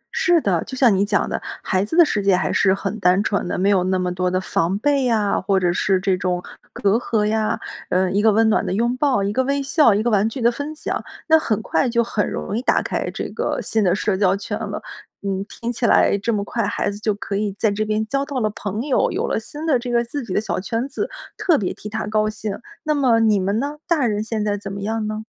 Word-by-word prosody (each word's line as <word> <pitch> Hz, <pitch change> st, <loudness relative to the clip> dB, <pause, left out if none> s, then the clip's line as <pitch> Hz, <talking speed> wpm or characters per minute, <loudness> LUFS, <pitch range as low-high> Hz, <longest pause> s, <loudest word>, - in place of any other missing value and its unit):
是 350 Hz, -2 st, +4 dB
的， 180 Hz, -, +1 dB
就 260 Hz, -, -7 dB
像 240 Hz, -6 st, +5 dB
你 195 Hz, -, +2 dB
讲 205 Hz, 0 st, +1 dB
的， -, -, -3 dB, 0.2 s
孩 190 Hz, -1 st, +1 dB
子 220 Hz, +11 st, -3 dB
的 345 Hz, -, +8 dB
世 210 Hz, -8 st, -1 dB
界 195 Hz, -1 st, +3 dB
还 180 Hz, -, 0 dB
是 190 Hz, -, +3 dB
很 195 Hz, +2 st, -4 dB
单 185 Hz, +2 st, +3 dB
纯 200 Hz, -3 st, -1 dB
的， -, -, -2 dB
没 190 Hz, +2 st, +2 dB
有 190 Hz, -3 st, +3 dB
那 185 Hz, 0 st, +1 dB
么 180 Hz, -1 st, -1 dB
多 180 Hz, 0 st, 0 dB
的 185 Hz, 0 st, 0 dB
防 185 Hz, 0 st, 0 dB
备 280 Hz, +3 st, +1 dB
呀， 220 Hz, -4 st, +1 dB
或 190 Hz, 0 st, +2 dB
者 175 Hz, -1 st, +1 dB
是 190 Hz, +1 st, +1 dB
这 190 Hz, 0 st, +1 dB
种 180 Hz, -1 st, -1 dB, 0.3 s
隔 200 Hz, +2 st, +1 dB
阂 225 Hz, -3 st, 0 dB
呀。 215 Hz, 0 st, 0 dB, 0.3 s
呃， 185 Hz, 0 st, +1 dB
一 200 Hz, +2 st, +2 dB
个 220 Hz, 0 st, +5 dB
温 225 Hz, +2 st, +3 dB
暖 -, -, +2 dB
的 -, -, -3 dB
拥 235 Hz, +5 st, +1 dB
抱， 260 Hz, -7 st, +2 dB
一 200 Hz, +1 st, -1 dB
个 260 Hz, +4 st, +2 dB
微 280 Hz, +1 st, 0 dB
笑， 275 Hz, -5 st, +4 dB
一 210 Hz, -, 0 dB
个 240 Hz, -, +1 dB
玩 210 Hz, +1 st, +3 dB
具 245 Hz, -, -7 dB
的 235 Hz, 0 st, +3 dB
分 290 Hz, +5 st, -5 dB
享， -, -, -3 dB, 0.2 s
那 320 Hz, 0 st, +6 dB
很 220 Hz, -8 st, -1 dB
快 260 Hz, -, +1 dB
就 235 Hz, 0 st, +2 dB
很 220 Hz, -2 st, -1 dB
容 200 Hz, -, -4 dB
易 235 Hz, -, -1 dB
打 -, -, +2 dB
开 -, -, -2 dB
这 -, -, -4 dB
个 -, -, -2 dB
新 220 Hz, -1 st, 0 dB
的 180 Hz, -2 st, +3 dB
社 205 Hz, -1 st, 0 dB
交 190 Hz, -1 st, +3 dB
圈 200 Hz, -, -4 dB
了。 -, -, -4 dB, 0.4 s
嗯， 195 Hz, -1 st, -2 dB
听 235 Hz, +1 st, -4 dB
起 235 Hz, -, -1 dB
来 -, -, +4 dB
这 230 Hz, +4 st, -1 dB
么 205 Hz, -1 st, 0 dB
快 230 Hz, +3 st, -2 dB
孩 205 Hz, 0 st, -1 dB
子 205 Hz, -, -8 dB
就 215 Hz, -1 st, 0 dB
可 205 Hz, -1 st, -5 dB
以 210 Hz, -1 st, -1 dB
在 220 Hz, -1 st, +2 dB
这 215 Hz, +2 st, -1 dB
边 215 Hz, 0 st, 0 dB
交 275 Hz, +3 st, 0 dB
到 280 Hz, -2 st, -3 dB
了 215 Hz, -3 st, +1 dB
朋 210 Hz, +2 st, -4 dB
友， 280 Hz, -2 st, +1 dB
有 -, -, -1 dB
了 -, -, 0 dB
新 295 Hz, +8 st, -7 dB
的 280 Hz, -6 st, +3 dB
这 245 Hz, +1 st, -6 dB
个 235 Hz, 0 st, +2 dB
自 270 Hz, +4 st, -4 dB
己 210 Hz, -, -8 dB
的 -, -, +2 dB
小 220 Hz, -, -2 dB
圈 230 Hz, +6 st, -2 dB
子， 410 Hz, -, -3 dB, 0.3 s
特 335 Hz, -5 st, +3 dB
别 190 Hz, -, -2 dB
替 210 Hz, -, -9 dB
他 220 Hz, 0 st, -3 dB
高 215 Hz, 0 st, +1 dB
兴。 215 Hz, -1 st, -4 dB, 0.3 s
那 305 Hz, -1 st, +1 dB
么 255 Hz, -6 st, +3 dB
你 215 Hz, -3 st, +3 dB
们 195 Hz, +3 st, 0 dB
呢？ 290 Hz, +3 st, -3 dB
大 315 Hz, -6 st, +2 dB
人 210 Hz, -2 st, 0 dB
现 220 Hz, -1 st, -2 dB
在 205 Hz, -1 st, 0 dB
怎 200 Hz, -1 st, -7 dB
么 200 Hz, -, -6 dB
样 220 Hz, +1 st, -2 dB
呢？ 215 Hz, 0 st, -4 dB
215 Hz, 290 characters per minute, -21 LUFS, 195-240 Hz, 0.4 s, 的